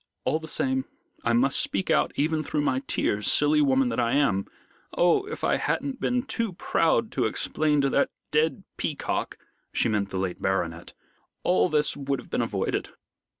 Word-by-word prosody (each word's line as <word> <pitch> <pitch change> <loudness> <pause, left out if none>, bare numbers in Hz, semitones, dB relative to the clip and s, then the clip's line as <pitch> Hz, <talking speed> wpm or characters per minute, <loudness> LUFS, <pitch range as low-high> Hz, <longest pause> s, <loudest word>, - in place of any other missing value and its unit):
"All 145 +5 +1
the 160 - -9
same, 130 -3 0 0.4
I 115 - +2
must 130 +4 +3
speak 190 - -1
out - - +3
even 155 +2 +1
through 150 0 -1
my 130 -2 +1
tears, 105 +1 +1
silly 150 +1 +4
woman 135 -2 +3
that 115 - -2
I 120 0 +1
am! 135 -9 +2 0.5
Oh, 175 - +4
if 455 - -7
I - - +2
hadn't 270 -2 -2
been 250 0 0
too 230 -7 -2
proud 170 +6 +1
to - - 0
explain 150 -2 +1
to 140 - +2
that 140 - +2 0.2
dead 155 +5 +1
peacock" 150 - -2 0.3
she - - +1
meant 100 -2 0
the 95 - -4
late 95 -1 -3
baronet 85 -3 -2 0.5
"all 90 0 +3
this 150 -1 +1
would 140 -1 -2
have - - -13
been - - +1
avoided." - - -1
140 Hz, 180 wpm, -26 LUFS, 115-155 Hz, 0.5 s, silly